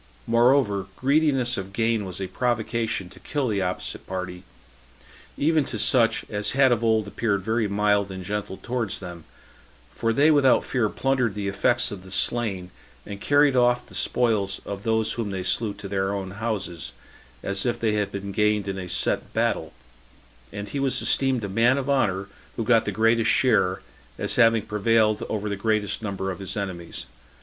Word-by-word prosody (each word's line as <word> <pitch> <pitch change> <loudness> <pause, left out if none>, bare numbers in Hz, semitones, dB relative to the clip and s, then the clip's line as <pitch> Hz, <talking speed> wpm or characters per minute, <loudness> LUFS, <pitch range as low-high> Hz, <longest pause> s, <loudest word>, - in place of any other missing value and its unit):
Moreover, 115 -5 +3
greediness 135 -3 +2
of 95 0 -6
gain 115 -1 0
was 95 0 -6
a 95 - -2
provocation 115 -2 -1
to - - -14
kill 145 -3 -2
the 100 -3 0
opposite 90 0 -3
party, 90 -1 -5 1.0
even 155 +1 +2
to 115 - -4
such 115 +2 +3
as 105 -1 -1
had 135 -1 +4
of 120 -1 +1
old 110 -2 +2
appeared 100 -2 -1
very 110 +1 0
mild 100 0 +1
and 95 -1 -7
gentle 105 -1 -4
towards 115 -5 -3
them; 85 -4 -9 0.7
for 115 - 0
they 145 +7 +4
without 140 -4 +4
fear 115 -4 0
plundered 130 -5 0
the 100 -1 -3
effects 120 +5 +1
of 100 -3 -7
the 95 - -13
slain, 100 -2 +1 0.3
and 100 -1 -8
carried 145 -1 +4
off 125 0 +3
the - - -17
spoils 105 -6 0
of 100 -1 -5
those 110 0 +1
whom 115 -3 -3
they 95 -2 -4
slew 105 +4 0
to 100 - -8
their 95 0 -1
own 95 -1 -5
houses, 100 - -4 0.5
as 100 0 0
if 120 - -1
they 110 -2 +1
had 105 -1 -1
been 100 0 -5
gained 105 0 +1
in 95 -1 -3
a 90 -1 -6
set - - -1
battle; - - 0 0.8
and 100 0 -6
he 140 - -3
was 135 -1 +1
esteemed 130 -4 +2
a - - -2
man 115 +7 +3
of 135 -1 -3
honor 100 -9 +1 0.3
who 115 - -2
got 115 0 +3
the - - -1
greatest 115 0 +2
share, 105 -5 +2 0.3
as - - -2
having 115 -3 +5
prevailed 110 0 +2
over 105 -1 -2
the 100 - -2
greatest 105 0 -1
number 95 -2 -3
of 95 - -7
his 95 +1 -5
enemies. 85 -9 -5
105 Hz, 180 wpm, -24 LUFS, 100-120 Hz, 1.0 s, having